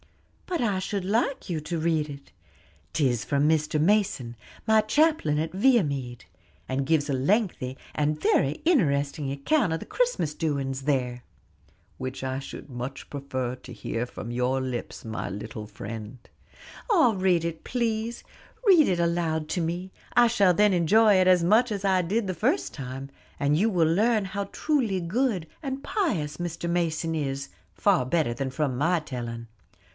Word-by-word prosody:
"But 355 -5 -1
I 205 -5 +1
should 190 0 -3
like 230 +7 0
you 165 -3 -2
to 165 +2 -3
read 160 -2 +1
it; 140 -1 -10 0.6
'tis 130 -8 +1
from 140 +8 +1
Mr. 155 -1 +1
Mason, 170 - +1 0.3
my 220 0 +5
chaplain 220 - +2
at 160 +2 -2
Viamede, 150 - +1 0.4
and 135 +1 -2
gives 150 -2 +2
a - - +1
lengthy, 135 - 0 0.2
and 150 +1 0
very 140 -2 +2
interesting 145 - +2
account 195 - +1
of 165 - -1
the - - -8
Christmas - - 0
doings 140 -4 -2
there." 125 -3 -1 0.8
"Which 130 +1 -5
I 130 0 -2
should 135 - -9
much 125 +2 -6
prefer 130 -3 -3
to 130 0 -13
hear 115 +1 -3
from 120 -1 -7
your 125 +2 0
lips, 130 -3 -5
my 110 -1 -4
little 105 +2 -6
friend." 105 +3 -7 0.7
"Ah, 320 - +5
read 185 -3 +2
it, 165 -1 -4
please; 230 -1 -2 0.4
read 360 -7 +6
it 180 -2 +1
aloud 170 -2 0
to 180 - -1
me; 175 +3 -3 0.2
I 240 - +7
shall 200 -6 +4
then 210 +3 +4
enjoy 205 +6 +5
it 185 0 +4
as 180 -2 +5
much 220 +7 +4
as 200 -1 -3
I 190 -1 +3
did 205 +6 0
the 185 - -1
first 255 - 0
time; 135 0 -6 0.3
and 145 +1 +2
you 205 +8 +3
will 175 -6 +3
learn 215 +3 +2
how 200 +1 -3
truly 230 -3 0
good 190 +1 0 0.2
and 270 -1 -4
pious 190 - -1
Mr. 170 -1 -4
Mason 165 -1 0
is, 135 -3 -3 0.2
far 195 -8 +3
better 130 -2 0
than 130 +2 -3
from 135 -2 -1
my 170 +5 +2
telling. 120 -5 -6
160 Hz, 165 wpm, -26 LUFS, 135-205 Hz, 0.8 s, I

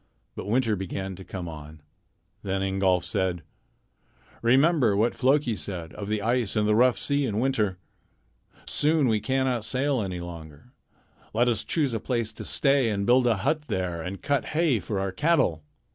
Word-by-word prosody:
But - - -6
winter 115 0 +1
began 95 0 -5
to 95 - -9
come 90 -2 -6
on. 75 -1 -9 0.6
Then 95 0 -2
Ingolf 95 -2 +1
said: 90 -2 -1 1.0
"Remember 130 -1 +4
what 115 +3 +2
Floki 135 -1 +2
said 85 -6 -5
of 100 - -6
the 105 -1 -1
ice 120 -2 0
and 105 -1 +2
the 105 - +3
rough 125 +2 +4
sea 140 -1 0
in 105 -2 -1
winter. 110 -7 0 0.9
Soon 150 -2 +2
we 110 -2 +2
cannot 130 -1 0
sail 130 +4 0
any 95 -3 -4
longer. 85 - -10 0.6
Let 120 +2 +3
us 120 -3 +1
choose 145 -7 0
a 115 - -1
place 115 -2 -2
to - - -8
stay 135 -4 +2
and 100 -2 -1
build 125 +2 +4
a 115 -3 +2
hut 150 +1 0
there 90 -6 -2
and 90 +4 -6
cut 145 -1 0
hay 160 -9 +3
for 100 0 -3
our 95 0 -2
cattle." 135 - +1
110 Hz, 175 wpm, -26 LUFS, 95-130 Hz, 1.0 s, Remember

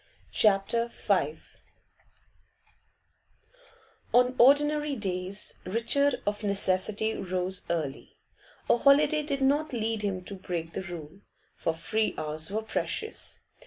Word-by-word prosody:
CHAPTER 215 +3 +3
V 460 - 0 2.8
On 250 +1 +5
ordinary 295 +3 +4
days 190 -2 -2
Richard 235 +8 +1
of 205 +1 -2
necessity 200 +2 0
rose 185 0 -3
early; 155 -5 -3 0.5
a - - +4
holiday 290 +4 +4
did 280 -2 -2
not 290 +2 +2
lead 225 -2 -1
him 195 -3 -2
to 200 - -6
break 175 -4 -5
the - - -3
rule, 175 0 -9 0.3
for - - -1
free 215 +7 -1
hours 155 +1 -3
were 215 +2 -2
precious. 440 - -3
210 Hz, 110 wpm, -28 LUFS, 185-260 Hz, 2.8 s, On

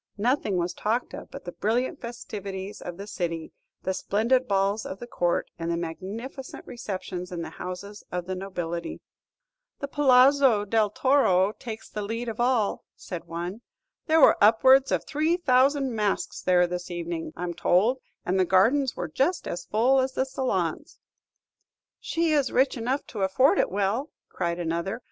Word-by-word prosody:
Nothing 220 -3 +1
was 175 0 -1
talked 230 +4 -1
of - - -8
but - - -10
the 175 - -5
brilliant 230 +8 -1
festivities 200 -4 -6
of 175 -1 -7
the 200 - -7
city, 170 -5 -4 0.3
the 190 - 0
splendid 235 +7 +1
balls 200 +2 +1
of 190 - -6
the 240 - -8
Court, 175 -7 -1
and 165 0 -3
the 170 - 0
magnificent 205 - -6
receptions 185 -6 -6
in 170 -2 -4
the - - -7
houses 200 +3 -7
of 180 -1 -3
the 185 - -3
nobility. 175 -3 -4 0.8
"The 280 - -3
Palazzo 265 -5 +5
della 215 0 +2
Torre 210 -8 +3
takes 225 -1 -8
the 210 - -5
lead 230 +3 -3
of 225 - -6
all," 240 -4 +1
said 175 -3 -7
one. 175 +6 -5 0.5
"There 320 0 +4
were 275 - +6
upwards 260 +5 +6
of - - 0
three 315 +3 +1
thousand 270 -3 +3
masks 210 -3 -1
there 180 -1 +4
this 175 +1 -5
evening, 170 -2 -4
I 175 - -5
'm 175 -1 -2
told, 205 +9 +2 0.3
and 185 +2 +1
the - - +5
gardens 230 +10 +3
were 175 - -3
just 270 - 0
as 175 - -4
full 250 +5 +3
as 260 0 0
the 260 - 0
salons." 250 - -2 1.0
"She 330 -1 0
is 285 -4 +2
rich 260 +2 +3
enough 255 +4 -2
to 210 - -6
afford 195 +9 +3
it - - +2
well," 205 +9 -1 0.2
cried 170 -1 -2
another. 170 +5 -2
210 Hz, 170 wpm, -26 LUFS, 180-255 Hz, 1.0 s, were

